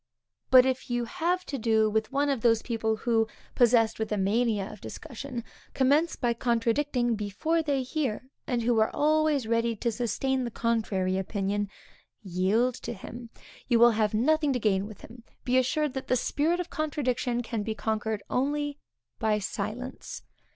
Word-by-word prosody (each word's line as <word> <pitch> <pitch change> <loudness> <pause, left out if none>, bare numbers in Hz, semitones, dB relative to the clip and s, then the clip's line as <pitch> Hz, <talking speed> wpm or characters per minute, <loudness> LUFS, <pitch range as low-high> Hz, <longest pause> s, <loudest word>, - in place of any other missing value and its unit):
But 255 -1 +8
if 260 -1 -1
you 240 0 0
have 360 +5 -1
to 275 - -4
do 220 -1 +3
with 220 +2 -1
one 285 +1 +1
of 270 -5 0
those 230 -1 +3
people 220 -2 -1
who, 225 0 +1 0.3
possessed 235 -3 +3
with 220 -1 -2
a 210 - +1
mania 210 +1 +1
of 210 - -13
discussion, 240 - -7 0.3
commence 290 +5 +3
by 240 -1 0
contradicting 240 +2 +1
before 215 +11 -1
they 285 -4 0
hear, 260 -3 -2 0.2
and 245 -4 0
who 235 -1 +2
are 220 - +3
always 305 -3 +2
ready 230 0 +1
to 235 +2 -1
sustain 255 +3 -1
the 240 - -2
contrary 210 -5 0
opinion, 200 +1 -2 0.5
yield 195 +7 +1
to - - -4
him; 235 +3 -9 0.4
you 240 - +4
will 235 +1 +7
have 215 -1 +1
nothing 300 +5 +2
to 250 - -1
gain 200 -3 +1
with 215 -2 -12
him. 230 +1 -13 0.2
Be 255 +1 +3
assured 280 +3 0
that 265 -1 -5
the 255 - +2
spirit 310 +7 0
of 360 0 -4
contradiction 255 -5 -1
can 225 -1 -3
be 220 +1 -3
conquered 220 -1 -2
only 290 +2 -1 0.4
by 220 -2 +2
silence. 215 +5 -5
235 Hz, 170 wpm, -28 LUFS, 220-265 Hz, 0.5 s, But